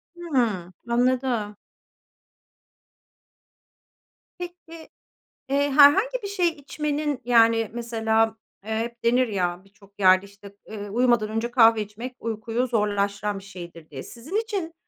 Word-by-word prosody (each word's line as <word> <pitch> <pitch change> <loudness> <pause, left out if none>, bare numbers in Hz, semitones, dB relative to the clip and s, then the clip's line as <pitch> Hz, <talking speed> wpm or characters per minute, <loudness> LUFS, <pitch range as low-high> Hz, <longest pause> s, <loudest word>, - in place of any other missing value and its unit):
Hımm, 235 - -1 0.2
anladım. 245 -3 0 2.8
Peki, 345 -2 -10 0.6
eee, 285 +1 +1
herhangi 390 - +5
bir 400 - -3
şey 385 -3 +1
içmenin, 295 -2 -3
yani, 230 -2 +4
mesela, 225 -1 0 0.3
eee, 220 - -6
hep 235 +1 -5
denir 245 +2 +3
ya 180 -3 -2
birçok 200 0 -23
yerde, 185 0 +5
işte, 200 0 -15
eee, 205 -1 -7
"Uyumadan 240 -1 +2
önce 225 +2 -2
kahve 225 -3 +5
içmek 230 +5 -7
uykuyu 230 +2 -2
zorlaştıran 205 -2 -1
bir 195 - -15
şeydir." 170 -4 -11
diye. 135 -3 -8
Sizin 250 - -9
için 410 -7 -2
230 Hz, 115 wpm, -24 LUFS, 205-280 Hz, 2.8 s, herhangi